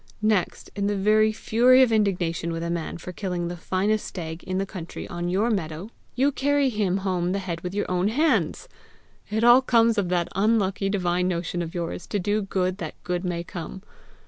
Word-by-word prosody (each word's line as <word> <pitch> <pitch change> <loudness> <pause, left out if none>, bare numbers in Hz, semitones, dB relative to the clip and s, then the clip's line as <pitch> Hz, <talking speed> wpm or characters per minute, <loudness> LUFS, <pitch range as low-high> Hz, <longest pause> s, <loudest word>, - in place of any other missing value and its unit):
Next, 215 -4 0
in 200 0 0
the 205 - 0
very 215 +2 +3
fury 245 +4 +4
of 245 - +2
indignation 180 -6 0
with 165 0 -3
a 170 - -2
man 170 -1 -3
for 175 +1 -8
killing 180 -2 -3
the 175 - -4
finest 195 +5 0
stag 160 -2 -6
in 185 0 -2
the 195 - 0
country 185 -4 -7
on 175 0 -3
your 205 +6 +1
meadow, 175 +1 -3 0.2
you 270 +4 +3
carry 285 0 +2
him 205 -5 0
home 180 -1 0
the - - 0
head 175 -4 -4
with 180 +2 -5
your 205 - 0
own 180 +1 +1
hands! 250 - +1 0.6
It 220 +2 -1
all 240 +2 +8
comes 230 -3 +3
of 185 -3 -1
that 175 -1 +1
unlucky 195 -1 +1
divine 180 -2 0
motion 175 0 -2
of 165 0 -6
yours 170 0 -4
to 205 - -1
do 205 +3 0
good 185 -1 -1
that - - -5
good 180 0 -2
may 175 -2 -2
come! 180 +1 -8
190 Hz, 200 wpm, -25 LUFS, 175-215 Hz, 0.6 s, all